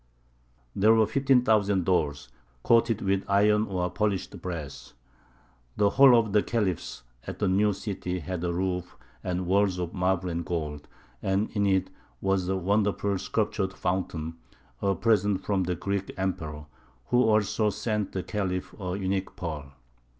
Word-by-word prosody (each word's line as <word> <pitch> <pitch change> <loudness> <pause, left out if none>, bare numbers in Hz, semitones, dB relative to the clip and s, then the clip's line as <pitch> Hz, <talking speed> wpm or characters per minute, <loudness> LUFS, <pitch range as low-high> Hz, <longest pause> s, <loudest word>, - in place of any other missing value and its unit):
There 110 +3 +5
were 110 -1 +5
fifteen 130 +3 +3
thousand 100 -5 +2
doors, 75 -7 0 0.3
coated 115 -1 +3
with 95 0 +1
iron 105 +2 +3
or 90 -2 -1
polished 100 -1 -2
brass. 80 -6 -7 0.8
The 100 -1 +3
Hall 135 -1 +7
of 110 -3 +1
the 105 - +5
Khalifs 100 - -2 0.2
at - - -5
the 105 - 0
new 100 +3 +3
city 95 -2 -4
had 90 +1 -4
a 90 - 0
roof 90 0 -2 0.3
and 90 0 -2
walls 95 0 +2
of 90 -2 -4
marble 90 -1 0
and 85 -1 -2
gold, 75 -3 -4 0.3
and 95 +2 0
in 100 -2 +1
it 95 -1 +1 0.3
was 95 -2 0
a 95 - +1
wonderful 100 +1 0
sculptured 95 -1 -1
fountain, 85 -4 -3 0.4
a 100 -1 +1
present 105 -4 +1
from 95 -3 +1
the 90 0 -1
Greek 100 +3 -3
Emperor, 80 -6 -3 0.4
who 125 - +4
also 110 -1 +2
sent 105 -1 -2
the 95 - -3
Khalif 95 -3 -3
a 90 0 -3
unique 95 0 -2
pearl. 75 -5 -5
95 Hz, 150 wpm, -27 LUFS, 90-105 Hz, 0.8 s, Hall